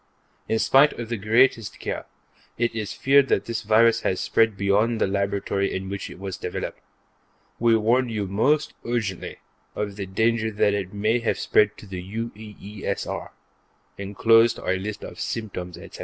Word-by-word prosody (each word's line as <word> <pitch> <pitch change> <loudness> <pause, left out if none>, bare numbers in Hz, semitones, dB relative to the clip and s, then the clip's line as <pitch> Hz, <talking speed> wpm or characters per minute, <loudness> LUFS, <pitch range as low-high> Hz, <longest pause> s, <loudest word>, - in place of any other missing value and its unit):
In 110 - +2
spite 135 +6 +5
of 120 -1 -7
the 120 - -1
greatest 115 +2 +2
care, - - -4 0.5
it 120 0 0
is 110 -2 -4
feared 140 0 +4
that 100 - +1
this 115 -1 -3
virus 110 +2 +4
has 95 - 0
spread 115 -3 +2
beyond 105 +4 +2
the - - +3
laboratory 100 0 -1
in 95 0 -4
which 100 0 -5
it - - -10
was 95 -1 -5
developed. - - -5 0.8
We 115 -1 +4
warn 120 +3 +2
you 105 -3 -2
most 130 +11 +1
urgently 115 -6 -3 0.4
of 105 -1 -3
the 100 -2 -4
danger 110 +3 +1
that 105 -1 +2
it 95 -2 -3
may 110 +4 +1
have 115 - -1
spread 105 0 +2
to - - -12
the 95 -2 -6
UEESR; 105 0 -5 0.7
enclosed 115 +4 +4
are - - -2
a 95 - 0
list 105 +2 -5
of - - -9
symptoms, 90 -6 -4
etc. 85 - -11
105 Hz, 170 wpm, -24 LUFS, 100-115 Hz, 0.8 s, spite